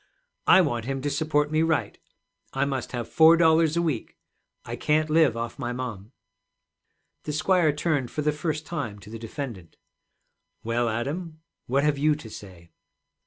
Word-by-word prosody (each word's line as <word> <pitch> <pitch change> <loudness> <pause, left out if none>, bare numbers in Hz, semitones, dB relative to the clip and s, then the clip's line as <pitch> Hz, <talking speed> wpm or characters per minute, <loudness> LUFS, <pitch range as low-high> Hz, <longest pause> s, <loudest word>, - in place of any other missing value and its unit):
'I 190 - +8
want 120 -9 -1
him 135 +1 -2
to 145 - -1
support 150 0 0
me 155 0 +2
right. 160 -2 0 0.5
I 135 +1 +1
must 135 -3 -3
have 120 -2 -4
four 160 +1 +6
dollars 160 -1 +4
a 170 - +2
week. 150 -9 -3 0.5
I - - -5
can't 155 +1 +1
live 155 -7 +4
off 115 0 -5
my 120 0 -3
mom.' 115 -4 -6 1.1
The 150 - -3
squire 160 +1 +3
turned 145 -4 -1
for 150 - -3
the 150 - +2
first 155 0 -3
time 145 -11 -4
to 105 +2 -13
the 115 - -7
defendant. 115 - -7 0.9
'Well, 115 +1 0
Adam, 155 +8 -4 0.3
what 135 +3 +1
have 150 -2 +1
you 150 +1 +3
to 115 -7 -10
say?' 90 -5 -12
145 Hz, 165 wpm, -26 LUFS, 120-155 Hz, 1.1 s, I